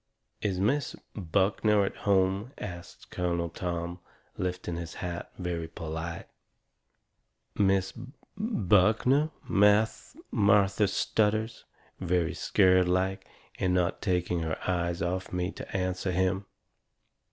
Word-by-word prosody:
"Is 95 -3 -1
Miss 130 +8 +1 0.2
Buckner 100 +2 +2
at - - -4
home?" 100 +4 +1
asts 85 -3 -8
Colonel 85 -1 -2
Tom, 85 0 -4 0.4
lifting 90 -1 -3
his 85 -1 -6
hat 85 -1 -5
very 85 -3 -3
polite. 80 +1 -5 1.3
"Miss 95 -1 +2
B - - -9
B 130 - -14 0.2
Buckner?" 125 - +3 0.2
Martha 105 -1 +3
stutters, 110 +3 0 0.3
very 90 -1 0
scared 95 -1 +3
like, 95 +1 0 0.3
and 90 -1 +1
not 90 0 0
taking 90 -3 0
her 80 -1 -2
eyes 85 -2 0
off 90 +2 -2
of - - -15
me 90 +1 -1
to - - -6
answer 95 0 -1
him. 95 +2 0
95 Hz, 115 wpm, -29 LUFS, 90-100 Hz, 1.3 s, Buckner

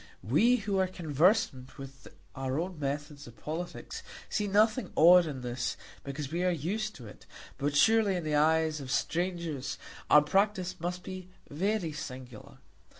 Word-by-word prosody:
We 205 - +4
who 205 -4 -1
are 190 - +2
conversant 155 - +1
with 135 -1 -11 0.3
our 135 +2 -2
own 175 -1 -4
methods 145 0 -4
of 120 - -14
politics, 165 +3 -6 0.3
see 210 -2 -1
nothing 215 +2 +2
odd 175 +1 +7
in 135 -4 -5
this, 120 0 -3 0.3
because 140 +1 -5
we 175 +2 -1
are 185 - +3
used 195 +7 -2
to 125 - -11
it; 105 - -13 0.3
but 145 +1 -1
surely 220 +4 +4
in 175 - -2
the 155 -1 -2
eyes 155 0 +2
of 130 - -8
strangers 170 -2 -2 0.3
our 150 - +7
practice 190 +2 0
must 180 +2 -4
be 185 -1 -8 0.2
very 185 +2 -1
singular. 130 -6 -9
160 Hz, 155 wpm, -30 LUFS, 140-185 Hz, 0.3 s, odd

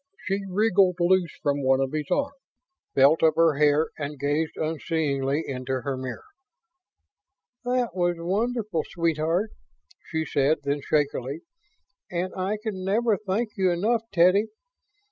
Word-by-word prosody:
She 195 0 -1
wriggled 195 -2 +3
loose 175 -1 +2
from 145 0 +1
one 130 0 +3
of 135 -1 0
his 150 -2 -3
arms, 280 0 0 0.6
felt 140 +4 +5
of 160 -1 +4
her 165 -3 +3
hair 150 +1 +3
and 145 0 -4
gazed 145 +3 -1
unseeingly 155 -2 -1
into 130 -1 -3
her 135 +2 -3
mirror. 130 -3 -6 1.4
"That 245 -3 0
was 175 -1 +1
wonderful, 205 0 -1
sweetheart," 170 +4 0 0.6
she 160 -1 -1
said 145 +1 +2
then, 140 +1 -1
shakily. 145 0 -1 0.7
"And 180 +1 -3
I 190 +3 -1
can 200 -5 -4
never 215 +3 +2
thank 210 +3 -2
you 190 -1 +3
enough, 215 +7 +1
Teddy. 185 +4 +4
165 Hz, 135 wpm, -25 LUFS, 145-195 Hz, 1.4 s, felt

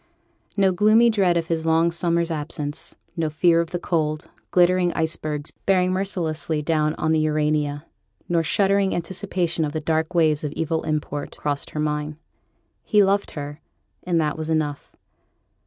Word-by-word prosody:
No 195 -1 +4
gloomy 215 +5 +5
dread 190 -5 +2
of 165 - 0
his 165 -1 -1
long 165 +1 +3
summer's 170 0 0
absence; 150 -1 -3 0.2
no 160 -2 0
fear 165 +2 +3
of 165 - -4
the 175 - -2
cold, 155 -2 -2 0.2
glittering 180 0 +3
icebergs 155 -2 -3 0.2
bearing 185 -2 +3
mercilessly 165 -5 -2
down 155 0 +1
on 160 - 0
the 160 - +3
Urania, 150 -1 0 0.4
nor 170 -1 +2
shuddering 195 +3 +2
anticipation 175 -1 -2
of 150 -1 -2
the 160 - -1
dark 160 +2 -1
waves 155 -3 +3
of 150 -1 -3
evil 160 0 -1
import, 150 -2 -3
crossed 145 -1 -2
her 150 - -5
mind. 150 0 -2 0.7
He 210 -1 +4
loved 200 +1 +1
her, 145 +1 -6 0.4
and 175 -2 0
that 155 0 -1
was 155 0 -3
enough. 150 -3 -2
160 Hz, 155 wpm, -23 LUFS, 150-180 Hz, 0.7 s, gloomy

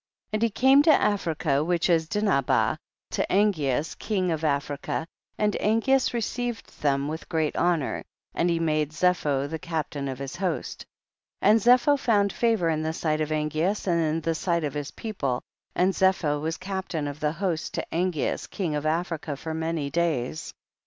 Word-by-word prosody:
2. - - -1
And - - -6
he 230 - +3
came 265 +6 +5
to 305 - +3
Africa, 160 -7 +1
which 175 +1 +1
is 165 -3 +2
Dinhabah, 200 -11 +2 0.3
to - - 0
Angeas 155 -8 +1
king 190 -4 -1
of 160 -1 -2
Af 140 -2 +1
rica, 145 +2 -3 0.3
and 210 -1 +1
Angeas 240 +5 +2
received 240 -1 -4
them 140 -1 +1
with 160 +2 -6
great 160 -2 0
honor, 170 -6 0 0.3
and 175 - +1
he 170 -1 +1
made 155 -2 0
Zepho 155 -5 +1
the 160 +2 -5
captain 150 -4 -3
of 130 -1 -4
his 140 +4 -6
host. 185 -4 -3 0.6
3. - - +5
And 220 - +5
Zepho 250 +5 +5
found 205 -5 +2
favor 225 -7 +2
in 155 -1 0
the 160 0 -2
sight 155 -1 -1
of 155 - -1
Angeas 155 +6 0
and 170 -3 +2
in 160 0 0
the 165 +1 0
sight 170 +1 0
of 145 -2 -2
his 145 -1 -4
people, 140 - -3 0.3
and 185 +2 +3
Zepho 175 -7 +2
was 160 +1 -2
captain 185 -5 -3
of 145 +1 -6
the 150 0 0
host 170 -2 -2
to - - -2
Angeas 175 -3 -1
king 175 -6 -2
of 150 +1 -1
Africa 160 -2 -2
for 160 +3 -5
many 160 -3 -2
days. 155 -4 -1
165 Hz, 180 wpm, -26 LUFS, 150-195 Hz, 0.6 s, came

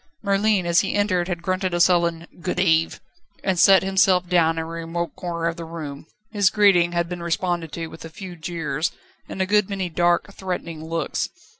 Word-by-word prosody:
Merlin 200 -1 +2
as 170 0 +4
he - - -1
entered 185 -4 +1
had 175 -2 -4
grunted 185 -1 -1
a - - 0
sullen 170 -2 +3 0.2
"Good 180 +1 -2
eve," 165 -3 +2 0.4
and 190 -3 0
sat 195 +1 +7
himself 190 -1 +3
down 170 -2 +3
in 160 - -1
a - - -7
remote 165 +1 -4
corner 170 -2 -3
of 170 +1 -3
the 170 - -6
room. 155 -3 -7 0.2
His 205 -3 +3
greeting 190 -5 +4
had 170 0 0
been 175 0 -6
responded 170 -1 -2
to 165 - -4
with 160 0 -11
a 165 - -8
few 180 +2 -9
jeers 160 -2 -3 0.4
and 190 - -2
a - - -1
good 210 +1 +2
many 195 -3 -3
dark, 175 +3 +1
threatening 170 -5 -5
looks. 165 -1 -2
175 Hz, 195 wpm, -23 LUFS, 165-190 Hz, 0.4 s, sat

